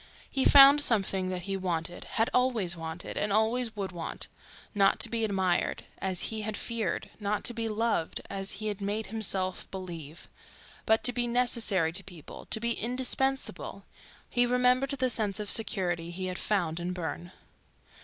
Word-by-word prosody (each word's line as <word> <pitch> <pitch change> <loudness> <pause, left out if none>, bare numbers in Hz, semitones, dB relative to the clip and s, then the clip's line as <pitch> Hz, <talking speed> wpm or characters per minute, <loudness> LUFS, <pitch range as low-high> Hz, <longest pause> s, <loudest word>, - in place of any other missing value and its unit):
He 270 - +1
found 280 +1 +9
something 195 -7 +1
that 180 -1 -4
he 195 +1 -2
wanted, 175 -2 -3
had 225 +1 0
always 235 -9 +2
wanted 165 +1 -6
and 205 - 0
always 220 +2 +1
would 195 -2 -4
want—not 195 +3 -2
to 230 - 0
be 230 0 -1
admired, 190 -4 0 0.2
as 190 -2 -1
he 220 -1 -2
had 215 0 -3
feared; 225 -6 -3
not 210 0 -1
to 240 - +1
be 230 -1 -2
loved, 215 -6 -1
as 195 0 -2
he 215 +2 -6
had 205 -1 -5
made 205 +2 -2
himself 190 -4 -1
believe; 170 -5 -8 0.6
but 220 0 +4
to 245 - +3
be 240 0 0
necessary 230 -8 +2
to - - 0
people, 175 -6 -11
to - - +4
be 235 +1 0
indispensable; 260 +3 -1 0.4
he 245 -1 +2
remembered 250 +2 +3
the 265 -2 0
sense 215 -4 +1
of 210 -1 +1
security 175 -6 +1
he 185 +2 -5
had 185 0 -4
found 175 -6 0
in 175 +1 -3
Burne. 175 0 -5
205 Hz, 165 wpm, -29 LUFS, 180-235 Hz, 0.6 s, found